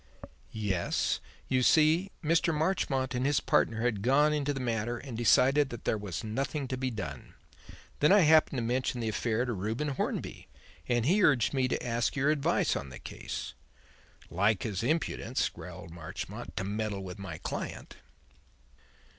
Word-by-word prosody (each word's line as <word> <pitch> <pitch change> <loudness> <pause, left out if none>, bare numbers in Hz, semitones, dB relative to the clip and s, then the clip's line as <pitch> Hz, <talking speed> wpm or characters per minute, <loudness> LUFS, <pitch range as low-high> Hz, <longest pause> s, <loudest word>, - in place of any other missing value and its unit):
"Yes. 100 -5 -1 0.3
You 130 -1 +2
see, 160 +8 +4
Mr. 165 +2 +2
Marchmont 150 -5 0
and 125 0 -1
his 145 +1 +2
partner 115 0 +1
had 115 -4 0
gone 145 +6 +4
into 145 -1 0
the 135 - -3
matter 120 -1 -1
and 125 -1 -8
decided 130 +5 +4
that 120 -3 -8
there - - +2
was 100 -3 -5
nothing 135 +6 -2
to 130 - -1
be 130 0 -2
done. 75 - -7 0.6
Then 150 - +4
I 205 0 +7
happened 155 -3 +5
to 120 - -1
mention 125 +1 -1
the 115 -2 -1
affair 115 +2 0
to 120 - -2
Reuben 110 +9 -2
Hornby, 135 - -3 0.4
and 120 -2 +2
he 190 +7 +3
urged 135 - +4
me 130 -2 +2
to 125 - -2
ask 115 -1 0
your 140 +2 +2
advice 145 -3 +1
on 70 - -4
the 65 - -9
case." - - -6 0.8
"Like 100 +3 +2
his 100 -5 -2
impudence," 155 +8 0
growled 85 - -10
Marchmont, 85 -2 -7
"to - - -1
meddle 100 0 -3
with 95 +1 -8
my 95 -5 -6
client." - - -6
125 Hz, 165 wpm, -30 LUFS, 110-145 Hz, 0.8 s, I